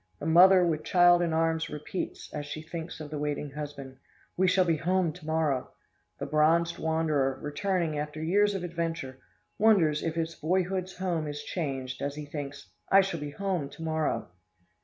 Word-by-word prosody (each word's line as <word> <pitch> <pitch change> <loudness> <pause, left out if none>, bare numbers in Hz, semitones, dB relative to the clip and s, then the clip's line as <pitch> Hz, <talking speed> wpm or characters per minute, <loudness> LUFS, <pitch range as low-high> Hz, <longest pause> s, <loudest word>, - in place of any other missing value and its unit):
The - - -6
mother 180 +3 +7
with 155 -2 0
child 175 -1 +5
in 170 -1 +1
arms 160 0 +1
repeats, 150 +5 -6
as 145 -1 -4
she 155 +2 -6
thinks 165 0 -7
of 155 -1 -8
the 150 - -3
waiting 145 -1 -3
husband, 140 -2 -7 0.4
"We 190 +1 +3
shall 185 0 +4
be 165 -2 +2
home 180 0 +1
to 180 -3 -13
morrow!" 155 -5 0 0.4
The 140 - -4
bronzed 160 +3 +2
wanderer, 155 -4 0
returning 160 +1 -1
after 150 +1 -5
years 200 +6 +2
of 190 - -3
adventure, 165 -6 -4 0.4
wonders 180 -9 +4
if 165 -1 -2
his 165 0 -2
boyhood's 185 +3 -1
home 175 -4 -1
is 145 0 -5
changed, 135 -6 -4
as 140 0 -2
he 150 0 -6
thinks, 145 -8 -7 0.2
"I 195 - +7
shall 190 -4 -3
be 145 0 -5
home 180 -3 -2
to 165 - -10
morrow!" 160 -1 -1
160 Hz, 180 wpm, -28 LUFS, 150-175 Hz, 0.4 s, mother